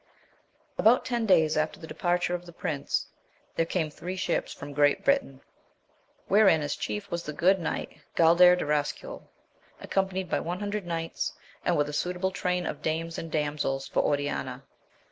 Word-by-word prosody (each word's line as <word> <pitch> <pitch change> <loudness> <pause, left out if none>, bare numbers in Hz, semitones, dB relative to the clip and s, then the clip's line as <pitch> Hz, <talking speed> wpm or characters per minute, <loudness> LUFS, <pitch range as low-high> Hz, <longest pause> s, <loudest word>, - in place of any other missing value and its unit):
[BOUT 235 +4 +4
tendaysafter 170 -10 +2
the - - -9
departure 175 0 0
of 175 0 -4
the - - -9
prince, 155 -4 -2 0.5
there 165 - +1
came 160 -3 -1
three 180 +5 -6
ships 185 - -1
from 145 0 -8
Great 145 0 +3
Britain, 270 - +1 0.9
wherein 195 -7 +5
as 145 - -2
chief 205 -1 -4
was 170 0 -1
the 150 - -5
good 185 +5 +3
knight 160 -2 -4 0.2
Gaidar 175 +2 +7
de 180 - -3
Rascuyl, 150 0 -2 0.6
accompanied 190 -1 -1
by - - 0
an 175 +2 -3
hundred 205 -2 -3
knights, 165 -1 -3 0.3
and - - +2
with 145 0 +2
a 150 - -6
suitable 180 +4 -1
train 180 -1 -1
of - - -4
dames 165 +1 -2
and 165 - -7
damsels 145 -3 -1
for - - -1
Oriana. 145 0 -2
170 Hz, 160 wpm, -28 LUFS, 150-185 Hz, 0.9 s, Gaidar